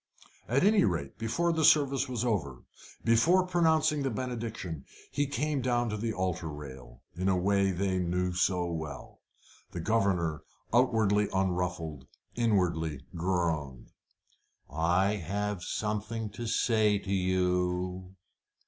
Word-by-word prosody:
At 130 Hz, +7 st, +2 dB
any 210 Hz, +2 st, +5 dB
rate, 85 Hz, -7 st, -2 dB
before 165 Hz, +10 st, 0 dB
the 160 Hz, -1 st, 0 dB
service 140 Hz, -2 st, +4 dB
was 125 Hz, -1 st, -2 dB
over, 75 Hz, -, -2 dB, 0.4 s
before 120 Hz, +12 st, +4 dB
pronouncing 160 Hz, -4 st, +2 dB
the 135 Hz, -, 0 dB
benediction, 115 Hz, -, -4 dB, 0.3 s
he 145 Hz, 0 st, 0 dB
came 145 Hz, 0 st, -1 dB
down 120 Hz, -1 st, +1 dB
to -, -, -2 dB
the 115 Hz, +2 st, -2 dB
altar 90 Hz, -4 st, -2 dB
rail, 65 Hz, -5 st, -10 dB
in 95 Hz, +2 st, -2 dB
the 95 Hz, -, +3 dB
way 100 Hz, +2 st, +2 dB
they 95 Hz, 0 st, 0 dB
knew 90 Hz, +1 st, 0 dB
so 90 Hz, 0 st, +1 dB
well. 80 Hz, -4 st, -6 dB, 0.5 s
The 85 Hz, -, -4 dB
governor, 90 Hz, -6 st, +1 dB, 0.3 s
outwardly 110 Hz, -4 st, +3 dB
unruffled, 90 Hz, -6 st, -2 dB, 0.3 s
inwardly 85 Hz, -, 0 dB
groaned. 80 Hz, -7 st, -2 dB, 0.8 s
"I 90 Hz, +6 st, +2 dB
have 100 Hz, +2 st, -3 dB
something 105 Hz, +3 st, -3 dB
to 115 Hz, +2 st, -6 dB
say 110 Hz, -2 st, +2 dB
to 100 Hz, 0 st, -4 dB
you." 90 Hz, 0 st, 0 dB
95 Hz, 125 wpm, -30 LUFS, 90-115 Hz, 0.8 s, any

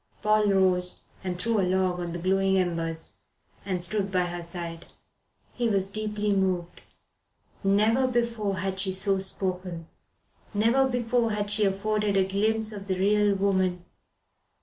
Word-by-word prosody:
Paul 215 Hz, 0 st, +3 dB
rose 185 Hz, -2 st, +2 dB, 0.2 s
and 180 Hz, -1 st, -3 dB
threw 225 Hz, +3 st, 0 dB
a -, -, +3 dB
log 185 Hz, -1 st, +1 dB
on 175 Hz, -1 st, -4 dB
the 175 Hz, -, -4 dB
glowing 190 Hz, +2 st, +2 dB
embers, 165 Hz, -3 st, -1 dB, 0.5 s
and 185 Hz, -3 st, -2 dB
stood 195 Hz, +2 st, -1 dB
by 185 Hz, -1 st, +2 dB
her 175 Hz, 0 st, -4 dB
side. 170 Hz, -1 st, -5 dB, 0.7 s
He 240 Hz, -2 st, 0 dB
was 195 Hz, -3 st, +2 dB
deeply 210 Hz, 0 st, -2 dB
moved. 185 Hz, -3 st, -1 dB, 0.8 s
Never 215 Hz, +6 st, +3 dB
before 235 Hz, -5 st, -1 dB
had 190 Hz, +1 st, -2 dB
she 190 Hz, -1 st, 0 dB
so 195 Hz, +1 st, +2 dB
spoken. 185 Hz, -3 st, -3 dB, 0.7 s
Never 235 Hz, +6 st, +3 dB
before 240 Hz, -2 st, 0 dB
had 205 Hz, -1 st, -1 dB
she 210 Hz, 0 st, +3 dB
afforded 205 Hz, +1 st, 0 dB
a 190 Hz, -1 st, +3 dB
glimpse 215 Hz, +3 st, 0 dB
of 200 Hz, -2 st, -8 dB
the 190 Hz, -1 st, -1 dB
real 205 Hz, +1 st, +3 dB
woman. 190 Hz, -2 st, 0 dB
195 Hz, 150 wpm, -27 LUFS, 185-210 Hz, 0.8 s, Paul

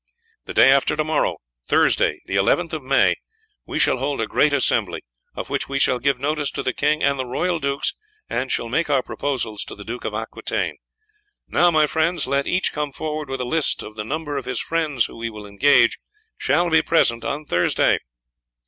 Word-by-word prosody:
The -, -, -8 dB
day 135 Hz, -, +7 dB
after 135 Hz, +2 st, +3 dB
to 155 Hz, -, +2 dB
morrow, 155 Hz, -1 st, 0 dB, 0.3 s
Thursday, -, -, +2 dB
the -, -, -6 dB
11th 160 Hz, -, +2 dB
of 155 Hz, -, -3 dB
May, 135 Hz, +1 st, +3 dB, 0.5 s
we -, -, -3 dB
shall -, -, +3 dB
hold 135 Hz, +2 st, -2 dB
a 115 Hz, -, +1 dB
great 150 Hz, +6 st, +2 dB
assembly, 145 Hz, -2 st, 0 dB, 0.3 s
of -, -, -6 dB
which -, -, -1 dB
we 135 Hz, -, -1 dB
shall 125 Hz, -2 st, +2 dB
give 140 Hz, -1 st, +1 dB
notice 150 Hz, +1 st, -1 dB
to -, -, -3 dB
the 130 Hz, -, -1 dB
king 150 Hz, +1 st, +1 dB
and 140 Hz, -1 st, +2 dB
the 130 Hz, -, -1 dB
royal 170 Hz, +7 st, -1 dB
dukes, 140 Hz, -1 st, -1 dB, 0.3 s
and 130 Hz, +1 st, -2 dB
shall 115 Hz, -, 0 dB
make 150 Hz, +7 st, 0 dB
our 135 Hz, -3 st, +2 dB
proposals 115 Hz, -7 st, -3 dB
to -, -, -9 dB
the 100 Hz, -, -11 dB
Duke 120 Hz, +2 st, -6 dB
of 105 Hz, -, -3 dB
Aquitaine. 115 Hz, +1 st, -3 dB, 0.7 s
Now, 175 Hz, -, +4 dB
my 155 Hz, -2 st, +4 dB
friends, 160 Hz, +3 st, 0 dB
let 140 Hz, 0 st, 0 dB
each 185 Hz, +1 st, 0 dB
come 150 Hz, -1 st, -2 dB
forward 155 Hz, 0 st, -4 dB
with 135 Hz, -1 st, -3 dB
a -, -, -2 dB
list 155 Hz, +4 st, 0 dB
of 105 Hz, -, -10 dB
the 105 Hz, -, -4 dB
number 145 Hz, +4 st, -3 dB
of 135 Hz, -, -4 dB
his -, -, -2 dB
friends 155 Hz, -7 st, 0 dB
who 115 Hz, -, -9 dB
he 115 Hz, -, -2 dB
will 105 Hz, -2 st, -10 dB
engage 115 Hz, +4 st, +3 dB, 0.4 s
shall 175 Hz, -1 st, +1 dB
be 160 Hz, 0 st, +5 dB
present 115 Hz, -9 st, +2 dB
on 150 Hz, +2 st, -3 dB
Thursday." 90 Hz, -9 st, +2 dB
140 Hz, 205 wpm, -22 LUFS, 125-155 Hz, 0.7 s, day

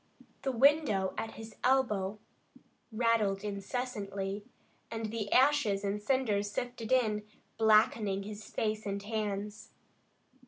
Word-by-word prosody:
The 270 Hz, -, 0 dB
window 255 Hz, -7 st, +3 dB
at 225 Hz, 0 st, -4 dB
his 225 Hz, 0 st, -10 dB
elbow 215 Hz, -6 st, +2 dB, 0.7 s
rattled 215 Hz, -4 st, +1 dB
incessantly, 200 Hz, -2 st, -3 dB, 0.5 s
and 225 Hz, -1 st, -4 dB
the 215 Hz, -3 st, -3 dB
ashes 255 Hz, -8 st, +4 dB
and 200 Hz, +1 st, -1 dB
cinders 210 Hz, -4 st, +1 dB
sifted 245 Hz, +1 st, -4 dB
in, 220 Hz, -5 st, +3 dB, 0.4 s
blackening 215 Hz, -2 st, +4 dB
his 210 Hz, +1 st, -8 dB
face 215 Hz, -1 st, -2 dB
and 200 Hz, 0 st, -3 dB
hands. 210 Hz, -1 st, -3 dB
215 Hz, 110 wpm, -32 LUFS, 200-235 Hz, 0.7 s, ashes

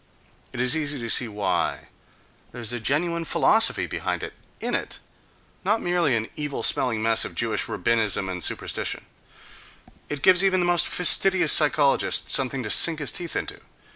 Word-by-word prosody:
It 125 Hz, -, -9 dB
is 125 Hz, +4 st, +6 dB
easy 145 Hz, -2 st, -1 dB
to 115 Hz, -1 st, -6 dB
see 125 Hz, -, +5 dB
why: 105 Hz, -3 st, -3 dB, 0.6 s
there 120 Hz, -, -10 dB
is 115 Hz, 0 st, -1 dB
a 120 Hz, -, -4 dB
genuine 170 Hz, +7 st, -1 dB
philosophy 220 Hz, +7 st, +1 dB
behind -, -, -5 dB
it, -, -, -7 dB, 0.3 s
in -, -, -4 dB
it, -, -, -4 dB, 0.7 s
not 210 Hz, +4 st, 0 dB
merely 175 Hz, -, -1 dB
an 110 Hz, 0 st, -3 dB
evil 145 Hz, -2 st, -5 dB
smelling 115 Hz, -4 st, +1 dB
mess 115 Hz, 0 st, +2 dB
of -, -, -6 dB
Jewish 110 Hz, -3 st, -1 dB
rabbinism 105 Hz, -1 st, -1 dB
and 90 Hz, -2 st, -5 dB
superstition,—it -, -, -4 dB, 1.2 s
gives 185 Hz, 0 st, +5 dB
even 190 Hz, -1 st, +1 dB
the 175 Hz, -, 0 dB
most 175 Hz, -1 st, +2 dB
fastidious 180 Hz, -1 st, +3 dB
psychologist 145 Hz, -2 st, +2 dB
something 135 Hz, -1 st, +1 dB
to 105 Hz, -, -5 dB
sink 165 Hz, -2 st, +4 dB
his 145 Hz, -2 st, -4 dB
teeth 175 Hz, -2 st, -6 dB
into. -, -, -5 dB
140 Hz, 165 wpm, -23 LUFS, 115-175 Hz, 1.2 s, is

